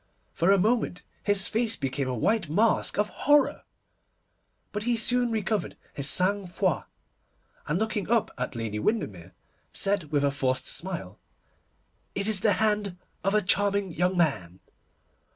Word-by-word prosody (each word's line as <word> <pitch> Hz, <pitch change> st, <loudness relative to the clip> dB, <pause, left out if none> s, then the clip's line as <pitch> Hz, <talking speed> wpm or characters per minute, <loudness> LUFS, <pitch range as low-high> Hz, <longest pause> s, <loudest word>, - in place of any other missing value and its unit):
For 170 Hz, +4 st, +3 dB
a 200 Hz, -, +6 dB
moment 215 Hz, -2 st, +1 dB, 0.2 s
his 205 Hz, -2 st, +2 dB
face 225 Hz, 0 st, 0 dB
became 135 Hz, -1 st, -2 dB
a 130 Hz, -, -2 dB
white 200 Hz, -, +1 dB
mask 215 Hz, +8 st, +2 dB
of 210 Hz, +1 st, +1 dB
horror, 290 Hz, 0 st, +2 dB, 1.1 s
but 210 Hz, -, -3 dB
he 235 Hz, +2 st, +1 dB
soon 245 Hz, +2 st, +1 dB
recovered 215 Hz, -3 st, -1 dB, 0.2 s
his 140 Hz, 0 st, -1 dB
sang 195 Hz, +1 st, +1 dB
froid, 180 Hz, -2 st, 0 dB, 0.8 s
and 150 Hz, -, 0 dB
looking 215 Hz, -2 st, -2 dB
up 235 Hz, -2 st, +2 dB
at 125 Hz, 0 st, -4 dB
Lady 110 Hz, -2 st, -3 dB
Windermere, 100 Hz, -, -2 dB, 0.4 s
said 195 Hz, -3 st, 0 dB
with 145 Hz, -1 st, 0 dB
a 140 Hz, -, +3 dB
forced 130 Hz, -2 st, -1 dB
smile, 170 Hz, -, -3 dB, 1.0 s
'It 200 Hz, +1 st, -1 dB
is 215 Hz, -3 st, +2 dB
the 205 Hz, +1 st, +3 dB
hand 210 Hz, -2 st, 0 dB, 0.3 s
of 195 Hz, +2 st, +1 dB
a 210 Hz, -, +3 dB
charming 200 Hz, 0 st, +1 dB
young 180 Hz, +3 st, +1 dB
man. 95 Hz, -, 0 dB
195 Hz, 150 wpm, -27 LUFS, 145-215 Hz, 1.1 s, a